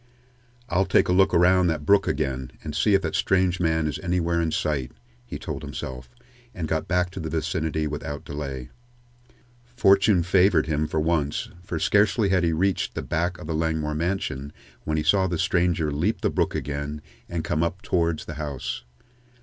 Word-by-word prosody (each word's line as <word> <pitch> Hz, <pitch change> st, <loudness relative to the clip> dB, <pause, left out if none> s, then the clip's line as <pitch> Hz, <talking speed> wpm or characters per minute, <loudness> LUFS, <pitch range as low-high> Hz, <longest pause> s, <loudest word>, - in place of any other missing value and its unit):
"I'll 95 Hz, 0 st, +1 dB
take 90 Hz, -, +3 dB
a -, -, +3 dB
look 95 Hz, +1 st, +4 dB
around 90 Hz, +1 st, +4 dB
that 80 Hz, -3 st, -1 dB
brook 100 Hz, +4 st, +4 dB
again, 70 Hz, -4 st, -1 dB
and 75 Hz, -, -5 dB
see 100 Hz, +6 st, +3 dB
if 95 Hz, -, +2 dB
that 80 Hz, -, -2 dB
strange 95 Hz, -1 st, +2 dB
man 80 Hz, -2 st, +1 dB
is 75 Hz, -, -2 dB
anywhere 85 Hz, -2 st, 0 dB
in 80 Hz, -, 0 dB
sight," 70 Hz, -5 st, -1 dB, 0.3 s
he -, -, -5 dB
told 75 Hz, -2 st, -5 dB
himself, 65 Hz, -4 st, -7 dB, 0.5 s
and 85 Hz, -4 st, -3 dB
got 80 Hz, 0 st, -1 dB
back 90 Hz, 0 st, +1 dB
to 95 Hz, -, -7 dB
the 80 Hz, -2 st, -4 dB
vicinity 80 Hz, -1 st, -1 dB
without 75 Hz, -1 st, -5 dB
delay. 70 Hz, -4 st, -6 dB, 1.0 s
Fortune 100 Hz, -5 st, +4 dB
favored 90 Hz, -2 st, +4 dB
him 75 Hz, 0 st, 0 dB
for 80 Hz, -, -1 dB
once, 75 Hz, -2 st, 0 dB
for 85 Hz, -1 st, -4 dB
scarcely 105 Hz, +5 st, +3 dB
had 95 Hz, -2 st, +2 dB
he 85 Hz, -, +2 dB
reached 95 Hz, +4 st, 0 dB
the -, -, -3 dB
back 90 Hz, +2 st, -1 dB
of -, -, -9 dB
the 80 Hz, -, -3 dB
Langmore 80 Hz, -1 st, -1 dB
mansion 75 Hz, -4 st, -2 dB, 0.3 s
when 80 Hz, 0 st, 0 dB
he 75 Hz, -, 0 dB
saw 95 Hz, +1 st, +3 dB
the 85 Hz, -2 st, -2 dB
stranger 85 Hz, -3 st, +1 dB
leap 85 Hz, +10 st, 0 dB
the -, -, +1 dB
brook -, -, 0 dB
again 75 Hz, +1 st, -4 dB, 0.3 s
and 85 Hz, -2 st, -3 dB
come 75 Hz, -, -1 dB
up 85 Hz, +3 st, -2 dB
towards 85 Hz, -3 st, 0 dB
the 80 Hz, -, -6 dB
house. 70 Hz, -4 st, -4 dB
80 Hz, 185 wpm, -25 LUFS, 75-90 Hz, 1.0 s, look